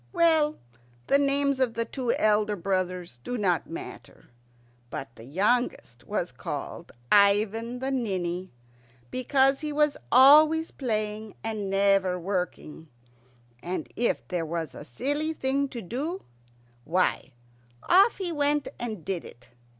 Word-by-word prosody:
Well, 315 -3 +3 0.5
the 280 - +3
names 280 -1 +2
of 250 -3 +1
the 230 0 -1
two 250 -2 -2
elder 210 0 +2
brothers 180 -6 -3
do 245 - -3
not 185 -6 0
matter, 165 - -10 0.6
but 125 -2 -7
the 115 - -12
youngest 190 - -1
was - - -2
called - - -6 0.2
Ivan 210 +4 +3
the 265 +2 -3
Ninny, 185 -7 -2 0.6
because 270 +1 +2
he 305 -1 -4
was 295 -1 +2
always 305 +5 +7
playing 215 -4 -3
and 215 -3 -3
never 195 -2 +3
working; 180 -3 -4 0.7
and 175 -3 -5
if 240 - 0
there 175 -2 -2
was 165 0 -4
a - - -9
silly 290 - -2
thing 275 -1 0
to 235 -3 -7
do, 290 - -4 0.6
why, 165 -3 0 0.5
off 390 +6 +5
he 370 -3 -3
went 290 -1 0
and 215 -8 -5
did 190 -3 -3
it. 120 - -14
220 Hz, 130 wpm, -27 LUFS, 185-275 Hz, 0.7 s, always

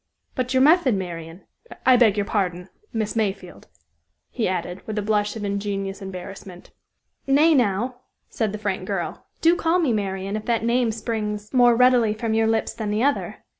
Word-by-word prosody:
But 255 -1 -2
your 260 0 +4
method, 300 - +5
Marian? 170 -2 -6 0.4
I 255 - +7
beg 225 -4 +4
your 205 - 0
pardon, 180 -3 -2 0.2
Miss 220 -2 -2
Mayfield," 195 -5 -3 0.6
he 235 - -1
added, 180 0 -3
with 215 -1 -4
a - - +1
blush 210 0 0
of 220 - -6
ingenuous 200 0 -3
embarrassment. 190 -1 -9 0.6
"Nay, 300 +4 +5
now," 245 -1 +1 0.3
said 220 -3 -2
the 210 - -4
frank 195 -3 -3
girl; 195 -4 -4
"do 335 +1 +5
call 335 +1 +1
me 310 -9 +1
Marian 195 -1 -2
if 215 - -5
that 230 -1 0
name 235 0 +2
springs 215 -1 -4
more 245 -2 +5
readily 245 -3 +4
from 220 0 -2
your 225 0 +2
lips 225 0 0
than 215 -2 -4
the 210 +3 0
other. 285 +1 -1
215 Hz, 175 wpm, -23 LUFS, 195-240 Hz, 0.6 s, I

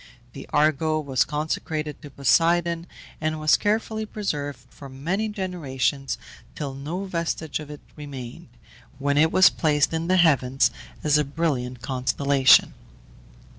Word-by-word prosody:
The 135 - -10
Argo 155 +1 +2
was 135 -4 +1
consecrated 155 0 -3
to 145 - -10
Poseidon, 165 +5 +2 0.3
and 155 0 -1
was 155 0 +4
carefully 220 +1 -1
preserved 150 -10 -4
for 140 - -11
many 175 +12 -2
generations 145 - -2 0.4
till 140 -3 -4
no 155 +8 -5
vestige 170 -4 -3
of 150 -1 -9
it 150 -1 -9
remained, 135 -5 -9 0.5
when 140 +1 +1
it 160 +1 +4
was 185 +1 +6
placed 150 -1 +1
in 165 +1 -2
the 185 +1 +3
heavens 135 -6 +3 0.3
as 150 0 +3
a - - +2
brilliant 135 -5 -2
constellation. 135 +1 +3
150 Hz, 130 wpm, -24 LUFS, 140-165 Hz, 0.5 s, was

